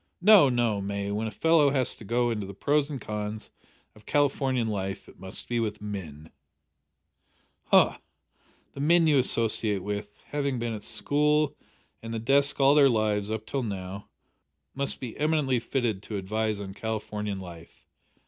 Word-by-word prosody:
No, 190 -6 +7
no, 120 -5 +1
May, 100 0 -3
when 110 +2 -2
a - - -2
fellow 160 +5 +4
has 135 -3 +1
to - - -11
go 120 +3 +1
into 105 -4 -3
the 100 - -9
pros 145 +5 +1
and 140 -3 -5
cons 105 0 -5 0.4
of 105 -1 -19
Californian 135 -4 +1
life 100 -2 -4
it - - -17
must 95 0 -7
be 120 -1 -1
with 105 -2 -2
men." 85 -7 -7 1.4
"H'm! - - +5 0.8
the - - -9
men 165 +4 +4
you 150 -3 +4
associate 110 -5 0
with, 105 0 -4 0.2
having 140 -3 -1
been 120 -1 -2
at 105 - -6
school 150 +7 +1 0.5
and 115 0 -5
the - - -1
desk 140 +6 +2
all 135 0 +6
their 145 -2 +6
lives 105 -3 0
up 110 0 -3
till 135 +4 -2
now, 100 -3 -6 0.6
must 140 0 -3
be 125 -4 -6
eminently 150 -5 +1
fitted 115 -4 -2
to 105 0 -5
advise 110 +2 -2
on 95 -1 -6
Californian 105 -2 -4
life! 85 -3 -12
110 Hz, 165 wpm, -27 LUFS, 105-140 Hz, 1.4 s, No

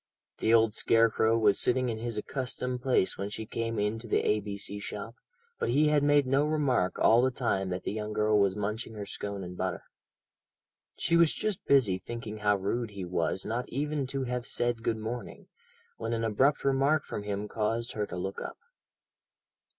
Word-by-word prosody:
The 110 - +2
old 115 -2 +5
scarecrow 115 0 +3
was 105 -3 +3
sitting 125 0 +2
in 110 -1 -3
his 115 0 -3
accustomed 125 +1 -3
place 125 -9 +1
when 100 +1 -2
she 110 +1 -5
came 115 +1 -3
into 110 +3 -1
the - - +2
A.B.C. 105 -1 -1
shop, 105 +2 -6 0.5
but - - 0
he 150 +5 +4
had 150 -1 +3
made 145 -1 +4
no 135 +3 +2
remark 145 -11 +1
all 115 +2 +5
the 130 - +3
time 105 -7 -1
that 90 0 -3
the - - -2
young 105 0 -4
girl 105 0 +2
was 100 -1 +2
munching 105 +2 -3
her 105 -1 -5
scone 100 -1 -4
and 90 0 -7
butter. 90 -2 -3 1.1
She 170 - +1
was 170 -2 +5
just 210 -4 -3
busy 110 -10 +4
thinking 110 +2 -6
how 105 -1 +3
rude 115 +5 -2
he 100 -3 -6
was 90 +1 -1
not 120 +3 -3
even 145 +1 -2
to 135 0 -2
have 125 -1 -3
said 120 -1 0
"Good 115 -1 0
morning," 115 +3 -6 0.5
when - - -3
an 115 0 -1
abrupt 130 +8 +2
remark 140 +3 +2
from - - -5
him 105 0 -3
caused 115 +2 -1
her 105 -1 -2
to - - -6
look 95 +2 -4
up. - - -6
115 Hz, 190 wpm, -29 LUFS, 105-125 Hz, 1.1 s, old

